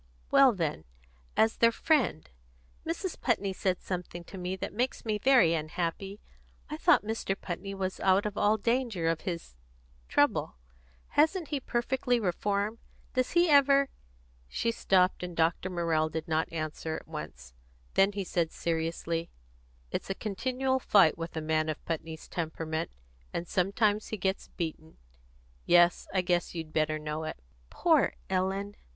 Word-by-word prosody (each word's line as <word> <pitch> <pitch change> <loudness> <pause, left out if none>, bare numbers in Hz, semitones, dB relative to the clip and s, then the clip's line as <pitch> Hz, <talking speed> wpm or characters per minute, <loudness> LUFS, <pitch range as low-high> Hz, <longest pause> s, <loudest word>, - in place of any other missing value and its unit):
"Well, 270 -2 +7
then, 165 - -2 0.5
as 220 0 +3
their 230 0 +5
friend. 275 - +1 0.6
Mrs. 340 +2 -3
Putney 200 -6 +1
said 185 0 0
something 175 -1 -5
to 190 - -10
me 180 +1 -2
that 190 - -5
makes 245 +4 -2
me 215 -1 0
very 245 -10 +5
unhappy. 170 +5 -3 0.5
I - - -3
thought - - +4
Mr. 215 -3 -2
Putney 195 +2 -5
was 190 -1 -3
out 190 +1 +3
of 210 -1 -3
all 210 +2 +3
danger 230 -6 0
of 165 -1 0
his 170 - -6 0.6
trouble. - - +2 0.5
Hasn't 320 +3 +2
he 290 -2 -1
perfectly 245 0 0
reformed? 205 +2 -1 0.3
Does 255 -1 0
he 345 +1 +5
ever 280 -2 +5 0.3
" - - -32
She 230 - +1
stopped, 185 -4 +2
and 180 -1 -6
Dr. 165 +3 +1
Morrell 165 -3 +1
did 160 +1 -4
not 160 0 0
answer 160 0 -3
at - - -8
once. - - -8 0.4
Then 195 +1 +4
he 200 -1 -2
said 170 -3 -1
seriously: 165 0 -2 0.6
"It's - - -3
a 195 - -1
continual 260 +6 -1
fight 195 - +5
with 165 0 -6
a - - -1
man 155 0 0
of 155 - -5
Putney's 160 -1 -5
temperament, 160 -1 -3 0.4
and 170 - -3
sometimes 205 +3 +1
he 215 - -4
gets 190 0 -1
beaten. 160 -2 -6 0.7
Yes, 175 0 +5
I 190 - +2
guess 175 -1 0
you'd 160 -2 -6
better 155 0 +1
know 150 +1 -4
it." - - -5 0.3
"Poor - - +3 0.2
Ellen!" 195 +2 -1
185 Hz, 155 wpm, -30 LUFS, 165-220 Hz, 0.7 s, Well